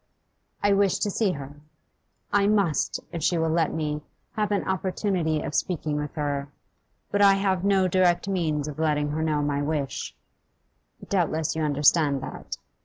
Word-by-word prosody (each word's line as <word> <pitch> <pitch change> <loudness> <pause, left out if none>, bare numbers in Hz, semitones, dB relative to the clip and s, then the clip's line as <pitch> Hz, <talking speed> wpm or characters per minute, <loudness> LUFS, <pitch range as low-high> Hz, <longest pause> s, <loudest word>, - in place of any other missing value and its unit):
I 205 0 +4
wish 195 -2 +3
to 205 - -1
see 200 -2 +1
her; 140 0 -8 0.8
I 200 0 +4
must, 200 -7 +1
if 170 - -4
she 175 +3 +2
will 160 -1 +1
let 165 -1 +2
me, 150 -2 -2 0.3
have 210 -1 -1
an 200 - 0
opportunity 185 -4 0
of - - -5
speaking 155 -4 -1
with 150 -1 -4
her. 145 -2 -2 0.6
But 205 - +1
I 200 -1 +7
have 190 -2 0
no 195 -2 +3
direct 180 0 +2
means 155 -6 -1
of 150 0 -7
letting 150 -2 +1
her 155 +1 -2
know 155 -2 0
my 145 -1 0
wish; 145 -2 -3 0.9
doubtless 160 -5 0
you 160 - -1
understand 145 -1 +3
that. - - -7
160 Hz, 165 wpm, -26 LUFS, 150-190 Hz, 0.9 s, I